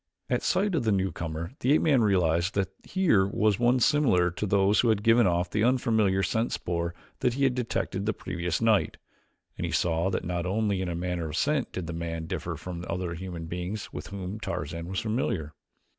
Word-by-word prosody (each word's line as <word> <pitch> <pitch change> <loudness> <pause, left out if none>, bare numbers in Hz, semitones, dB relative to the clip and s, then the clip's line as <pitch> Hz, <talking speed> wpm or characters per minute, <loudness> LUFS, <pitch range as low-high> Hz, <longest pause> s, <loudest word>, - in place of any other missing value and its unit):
At - - +2
sight 200 +1 +1
of 160 - +1
the 110 - +2
newcomer 85 -4 -2
the 130 +4 +3
ape - - +3
man 140 -6 +4
realized 90 -3 +2
that 95 -1 -1
here 155 - +2
was 105 0 +1
one 120 +1 +3
similar 115 - +3
to 105 +5 -3
those 100 +1 +3
who 120 - +3
had 105 -2 +1
given 115 -1 +5
off 90 0 0
the 105 - +1
unfamiliar 110 -6 +2
scent 115 +5 0
spoor 85 0 -2 0.2
that 125 -2 +1
he 140 - 0
had 135 -2 +4
detected 110 -5 -2
the - - +3
previous 90 -3 -3
night, 110 -3 +2 0.6
and - - -2
he - - -4
saw 85 +2 +1
that 95 - -2
not 90 0 -2
only 100 -1 0
in 95 - -2
the 85 - -3
matter 90 -1 -2
of 75 - -4
scent 150 -3 +1
did 90 - -4
the 85 - -5
man 85 -1 -4
differ - - -4
from 90 -1 -7
other 90 -2 -2
human 85 -1 -6
beings 90 +5 -5
with - - -6
whom 100 +1 -6
Tarzan 85 -5 -4
was 95 +1 -2
familiar. 105 - -2
95 Hz, 205 wpm, -28 LUFS, 85-115 Hz, 0.6 s, given